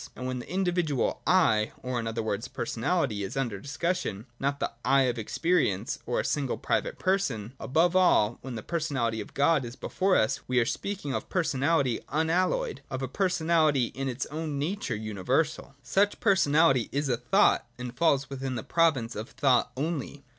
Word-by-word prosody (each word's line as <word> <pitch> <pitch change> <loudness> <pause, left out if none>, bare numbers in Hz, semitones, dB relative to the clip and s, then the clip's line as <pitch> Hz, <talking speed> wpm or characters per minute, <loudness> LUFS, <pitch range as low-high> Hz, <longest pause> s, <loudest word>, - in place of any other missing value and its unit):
And 125 - -6
when 130 0 -2
the - - -9
indi 185 0 0
vidual 160 -7 0
' - - -13 0.3
I,' 105 0 -1
or 125 -1 -2
in 115 - -3
other 115 0 -2
words 110 +2 -2
personality, 115 - -1
is 95 - -5
under 120 -7 -2
discussion 140 - -2
— 120 - -38
not 140 +1 -1
the - - -1
' - - -38
I - - +6
' - - +4
of 125 -2 0
experience, 110 - 0
or 120 - 0
a - - -1
single 140 -4 -1
private - - -1
person 135 - -1
— - - -36
above 165 +6 +2
all, 120 - +4
when 130 -2 -6
the 110 - -6
personality 135 -10 -1
of - - -11
God 145 0 +3
is 120 0 -7
before 190 +5 0
us, 110 - +2
we 125 0 +2
are 120 - +3
speaking 185 - -3
of - - -4
personality 140 -6 +1
unalloyed, 180 - 0
— - - -35
of 130 -1 -4
a - - -1
personality 160 -4 +2
in 135 +1 -3
its 125 0 -3
own 155 -1 -3
nature 175 - -2
universal. 125 - -1
Such 200 +1 +1
per 200 - +4
sonality 145 - +3
is 145 +1 -1
a 125 -3 +1
thought, 125 - +3
and 125 0 -6
falls 145 -3 +2
within 135 -1 -4
the 110 - -4
province 145 -9 +1
of 110 +5 -5
thought 130 -4 +2
only. 145 -1 -3
135 Hz, 200 wpm, -28 LUFS, 120-165 Hz, 0.3 s, I